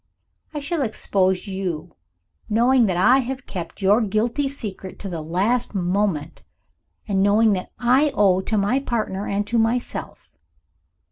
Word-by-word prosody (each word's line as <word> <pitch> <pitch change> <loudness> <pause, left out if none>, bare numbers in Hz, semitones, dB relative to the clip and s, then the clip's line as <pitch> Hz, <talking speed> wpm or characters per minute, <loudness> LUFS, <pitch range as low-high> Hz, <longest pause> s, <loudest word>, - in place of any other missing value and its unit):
"I 300 - -4
shall 290 +2 -2
expose 190 -6 0
you, 180 -4 -4 0.5
knowing 240 +2 +4
that 180 -2 0
I 245 +9 +5
have 260 0 -4
kept 180 +1 -7
your 205 +5 +4
guilty 230 +7 0
secret 205 -8 -7
to 200 - -6
the 170 -3 -4
last 200 +10 0
moment 180 -4 -1 0.7
and 195 -2 +1
knowing 210 +2 +4
what 185 -1 -3
I 260 +5 +3
owe 190 -2 +4
to 215 +3 -1
my 205 +7 +2
partner 215 -7 -3
and 200 +1 -1
to 230 +2 0
myself. 230 +2 -2
210 Hz, 145 wpm, -22 LUFS, 190-245 Hz, 0.7 s, I